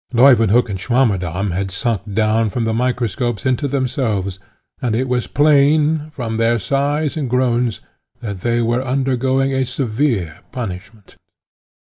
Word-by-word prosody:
Leuwenhock 120 -2 +5
and 95 -3 -4
Swammerdamm 100 -6 0
had 95 +2 -2
sunk 105 +1 -3
down 110 0 +2
from 120 +3 -2
the 115 - 0
microscopes 120 -2 -1
into 130 +3 +1
themselves, 120 -8 -1 0.4
and 120 -3 0
it 130 +3 0
was 125 -1 -1
plain, 150 +1 +3
from 120 -7 -4
their 115 +1 +2
sighs 140 - -1
and 145 -5 -2
groans, 120 -3 0 0.4
that 100 -5 -5
they 120 +4 0
were 120 +3 0
undergoing 130 0 0
a 130 0 +1
severe 120 - -1
punishment. 100 -3 -7
120 Hz, 135 wpm, -18 LUFS, 110-130 Hz, 0.4 s, Leuwenhock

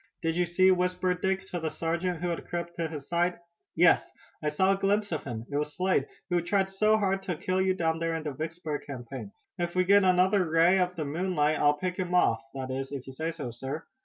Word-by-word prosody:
"Did 165 0 0
you 180 0 +2
see?" 185 +3 +4
whispered 180 0 0
Dick 190 0 +1
to 175 - -3
the 160 -1 -2
sergeant 170 +2 -2
who 175 - 0
had 170 - -4
crept 170 0 -4
to 165 -1 -1
his 150 -3 -7
side. 175 +1 +1 0.4
"Yes, 175 +1 +4 0.3
I 150 - 0
caught 190 +6 +3
a 195 - -4
glimpse 205 +1 +1
of 155 - -3
him. 115 -4 -5
It 145 - 0
was 150 0 -2
Slade, 185 +1 +1 0.2
who 175 -1 +3
tried 190 +2 0
so 215 +3 +3
hard 195 -2 0
to 185 -3 -3
kill 185 +4 -1
you 190 0 +2
down 165 -2 0
there 165 0 -1
in 160 - -4
the 150 - -3
Vicksburg 155 +1 -4
campaign. 125 -5 -7 0.3
If 175 0 -2
we 185 - +4
get 200 +2 +5
another 185 0 +3
ray 165 +4 +5
of 180 0 0
the 155 -3 -3
moonlight 155 -1 0
I'll 145 0 +4
pick 180 +2 -3
him 180 -1 -1
off, 115 -10 +3
that 130 -1 -4
is 135 +1 -4
if 135 -3 -5
you 135 - -9
say 160 +5 -3
so, 150 -7 -5
sir." 135 +6 -6
170 Hz, 240 wpm, -28 LUFS, 150-185 Hz, 0.4 s, get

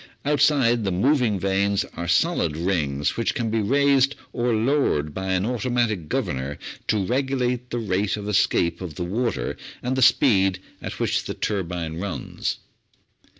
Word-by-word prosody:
Outside 140 -5 +3
the 95 - 0
moving 115 +1 +2
vanes 100 +1 +1
are 85 +1 -4
solid 85 - +1
rings 75 -6 0
which 115 - 0
can 115 -5 -1
be 110 0 +1
raised 140 +3 +3 0.2
or 120 0 0
lowered 110 - +1
by 95 +3 -4
an 95 +1 +1
automatic 120 -8 -1
governor 65 +2 -2 0.3
to 105 -3 +1
regulate 125 0 -1
the 120 - -3
rate 100 -2 0
of 105 -1 -6
escape 85 -4 +1
of 85 -5 -6
the 90 - -3
water 110 - -1 0.3
and 125 +1 -1
the 130 - 0
speed 95 -7 +4 0.2
at - - -6
which - - 0
the - - -4
turbine 85 -5 -3
runs. 95 -1 -3
105 Hz, 150 wpm, -24 LUFS, 90-125 Hz, 0.3 s, speed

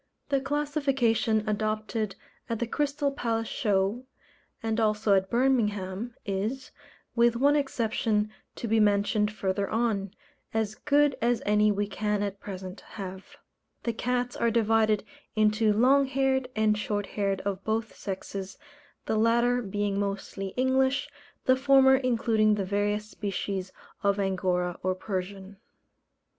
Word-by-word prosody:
The 275 -1 +2
classification 275 -7 +1
adopted 215 -1 -1 0.3
at 230 - -1
the 235 - -1
Crystal 285 +3 -1
Palace 230 -4 -2
Show, 205 +3 0 0.6
and 225 0 0
also 215 -1 +2
at 190 0 +2
Birmingham, 230 -4 0
is 215 +7 -3 0.4
with 235 0 +4
one 285 +4 +4
exception, 225 -6 0 0.2
to 235 - -4
be 225 0 +3
mentioned 210 0 +2
further 200 -1 -2
on 215 -4 0 0.4
as 220 -2 0
good 290 +3 +2
as 240 0 +1
any 210 0 +4
we 205 0 0
can 210 0 -1
at 200 -1 -4
present 190 -1 -7
have. 190 -2 -8 0.5
The 235 - -1
cats 245 +1 -1
are 235 - +1
divided 220 -1 +2 0.3
into 215 0 +3
long 265 +6 +4
haired 265 -1 +1
and 215 -1 +3
short 205 -1 -2
haired 195 -2 -1
of 195 -1 -3
both 220 0 -2
sexes, 195 0 -6 0.5
the 220 - 0
latter 235 +2 +3
being 205 -1 -1
mostly 195 -1 -3
English, 265 +1 +2 0.3
the 255 - +5
former 265 0 +6
including 225 -4 +2
the 200 -2 -2
various 205 +2 -1
species 195 -3 -4 0.3
of 200 -1 +1
Angora 180 -2 0
or 185 0 0
Persian. 195 +1 -5
215 Hz, 130 wpm, -28 LUFS, 200-245 Hz, 0.6 s, former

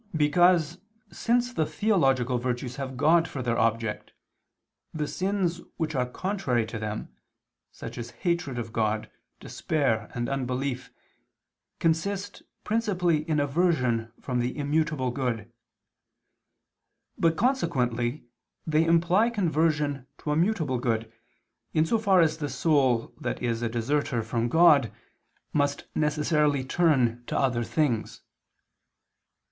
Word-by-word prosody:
Because, 170 +2 +3 0.3
since 245 +1 0
the 155 -10 0
theological 135 - +1
virtues 125 +1 -3
have 130 -2 -5
God 165 +4 +4
for 130 - -5
their 120 -1 0
object, 115 -1 -1 0.8
the 150 -1 -1
sins 185 -2 -1 0.2
which 160 -2 -2
are 125 -3 0
contrary 140 - -1
to 110 0 -6
them, 110 0 -4 0.6
such - - -8
as 120 0 -6
hatred 160 +1 -2
of 115 -2 -5
God, 110 -1 -1 0.3
despair 125 -9 -1
and 120 0 -2
unbelief, 130 -1 -3 0.9
consist 195 +5 -1 0.2
principally 180 -8 0
in 155 -2 +2
aversion 135 -7 +1
from 125 -2 -2
the 120 +3 -2
immutable 150 -3 0
good; 120 -4 -3 1.6
but, 165 -1 +1
consequently, 125 - 0 0.4
they 155 0 +2
imply 170 +7 +3
conversion 155 - 0
to 150 - -4
a - - +1
mutable 160 - +1
good, 115 -2 -2 0.6
in 155 0 +4
so 225 +7 +1
far 195 -4 +4
as 160 -2 +2
the 145 -2 -3
soul 130 -4 +1
that - - -3
is 115 -1 -1
a 120 - -1
deserter 120 +1 -1
from 115 +1 -1
God, 150 -6 +5 0.6
must 145 -1 0
necessarily 150 -2 +1
turn 130 -6 +2
to - - -2
other 125 -3 +1
things. 125 -4 -1
145 Hz, 120 wpm, -27 LUFS, 120-165 Hz, 1.6 s, God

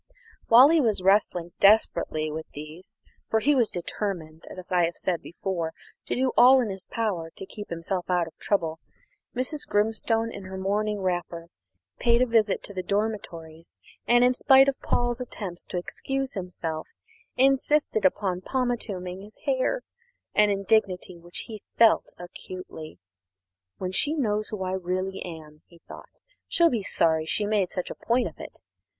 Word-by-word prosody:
While 250 +5 +8
he 325 -1 +4
was 215 -7 +1
wrestling 185 -3 +2
desperately 170 -7 +3
with 160 +1 -6
these, 155 +6 -10 0.3
for 220 - +2
he 295 +6 +3
was 245 -5 +3
determined, 170 -3 -5
as 185 0 -10
I 175 -2 +4
have 170 - -4
said 175 -3 -1
before, 170 -2 -4 0.3
to - - -1
do 260 0 +1
all 255 +2 +8
in 240 -4 0
his 190 -1 -6
power 195 -8 -2
to - - -6
keep 205 +2 -9
himself 175 +2 -3
out 180 -1 +2
of 165 - -13
trouble, 165 -5 -1 0.6
Mrs. 260 +4 -2
Grimstone, 225 +2 +1
in 195 - -8
her 190 0 -7
morning 205 +2 -1
wrapper, 175 -2 -3 0.5
paid 235 0 +4
a - - +3
visit 225 -4 +2
to 200 - -8
the 185 - -3
dormitories 175 -5 -4 0.3
and, 240 +1 +5
in 250 0 +5
spite 265 +1 +6
of 275 - +2
all - - -13
Paul's 240 0 +1
attempts 195 -7 -6
to - - -4
excuse 270 +9 -3
himself, 175 -4 -5 0.5
insisted 270 -2 +2
upon 185 -1 +1
pomatuming 200 -7 -3
his 210 +2 -13
hair 275 - 0 0.5
an 210 0 +4
indignity 195 -2 +1
which 175 +1 -6
he 215 -3 -9 0.2
felt 230 -1 +5
acutely. 175 - -9 0.8
"When 185 - -3
she 290 +11 +2
knows 215 -7 0
who 210 -3 -4
I 185 - -2
really 185 +1 -3
am," 155 -3 -10
he 170 - -19
thought, - - -11 0.4
"she'll 335 -1 +3
be 230 - 0
sorry 160 -4 +1
she 210 - 0
made 205 -3 +1
such 180 - -4
a - - -6
point 240 +2 +2
of - - -11
it. - - -10
195 Hz, 165 wpm, -26 LUFS, 175-230 Hz, 0.8 s, While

